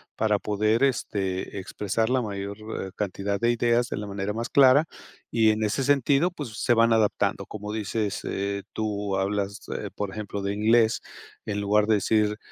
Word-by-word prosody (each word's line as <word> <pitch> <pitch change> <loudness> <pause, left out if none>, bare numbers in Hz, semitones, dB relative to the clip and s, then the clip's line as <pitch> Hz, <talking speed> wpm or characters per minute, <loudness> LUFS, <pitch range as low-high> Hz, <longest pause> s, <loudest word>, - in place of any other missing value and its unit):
para 105 -2 +1
poder, 110 +3 +1
este, 100 -7 -2
expresar 105 +4 -2
la 130 0 +2
mayor, 100 -2 -5 0.3
eh, 95 - -10
cantidad 100 0 -2
de 120 +3 +2
ideas 120 0 +2
de - - -3
la 105 0 -5
manera 100 0 -3
más 115 +2 -3
clara. 140 +2 +6 0.4
Y 110 -2 +3
en 110 0 +1
ese 110 +6 0
sentido, 145 +5 +3
pues, 130 -11 -7
se 120 - +4
van 115 0 +4
adaptando. 110 -2 +1
Como 105 0 -6
dices, 105 -1 -2
eh, 100 0 -3
tú 105 -2 -2
hablas, 100 +1 -1 0.2
eh, - - -5
por 105 -1 -3
ejemplo, 100 -1 -5
de 100 0 -1
inglés, 110 +2 +3 0.4
en 105 -1 -2
lugar 105 +1 +3
de 110 0 +3
decir 105 +1 +1
105 Hz, 175 wpm, -26 LUFS, 100-115 Hz, 0.4 s, clara